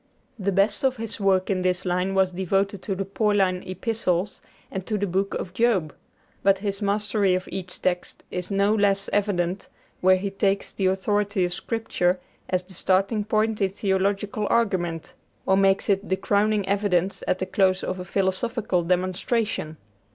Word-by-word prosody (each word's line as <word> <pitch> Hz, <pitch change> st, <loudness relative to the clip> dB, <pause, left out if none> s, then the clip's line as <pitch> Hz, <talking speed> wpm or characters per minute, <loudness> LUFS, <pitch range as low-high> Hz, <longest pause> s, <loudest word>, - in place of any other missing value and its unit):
The 200 Hz, 0 st, 0 dB
best 200 Hz, +4 st, +2 dB
of 265 Hz, -1 st, +2 dB
his 225 Hz, 0 st, -5 dB
work 195 Hz, -1 st, +2 dB
in 185 Hz, -1 st, 0 dB
this 185 Hz, 0 st, 0 dB
line 180 Hz, +2 st, 0 dB
was 190 Hz, -1 st, +3 dB
devoted 195 Hz, +2 st, 0 dB
to 195 Hz, -, -2 dB
the 195 Hz, +1 st, -3 dB
Pauline 195 Hz, -2 st, +1 dB
Epistles 185 Hz, -1 st, -1 dB, 0.3 s
and 190 Hz, -, -4 dB
to 215 Hz, -, 0 dB
the 205 Hz, -, 0 dB
Book 195 Hz, +1 st, -1 dB
of 180 Hz, -, -5 dB
Job; 190 Hz, -9 st, +1 dB, 0.5 s
but 195 Hz, 0 st, +4 dB
his 200 Hz, 0 st, -3 dB
mastery 205 Hz, -1 st, +1 dB
of 185 Hz, -, -3 dB
each 185 Hz, -2 st, -6 dB
text 180 Hz, -1 st, -2 dB
is 180 Hz, 0 st, -4 dB
no 200 Hz, +1 st, +2 dB
less 200 Hz, -2 st, +1 dB
evident 195 Hz, -2 st, 0 dB, 0.3 s
where 185 Hz, +1 st, +5 dB
he 195 Hz, +1 st, -3 dB
takes 195 Hz, 0 st, 0 dB
the 190 Hz, -, 0 dB
authority 200 Hz, 0 st, +1 dB
of 175 Hz, -, -2 dB
Scripture 185 Hz, -4 st, -1 dB, 0.3 s
as 185 Hz, -1 st, 0 dB
the 190 Hz, +1 st, -11 dB
starting 195 Hz, +4 st, +1 dB
point 215 Hz, 0 st, 0 dB
in 195 Hz, -, +3 dB
theological 200 Hz, +1 st, -1 dB
argument, 180 Hz, -8 st, 0 dB, 0.3 s
or 190 Hz, -, +4 dB
makes 195 Hz, 0 st, +3 dB
it 200 Hz, 0 st, +1 dB
the 190 Hz, -, +1 dB
crowning 205 Hz, 0 st, +1 dB
evidence 195 Hz, -2 st, 0 dB
at -, -, +2 dB
the 185 Hz, -, -2 dB
close 190 Hz, 0 st, +2 dB
of 185 Hz, -, -3 dB
a -, -, -4 dB
philosophical 195 Hz, +2 st, 0 dB
demonstration. 185 Hz, 0 st, -1 dB
195 Hz, 170 wpm, -25 LUFS, 185-205 Hz, 0.5 s, where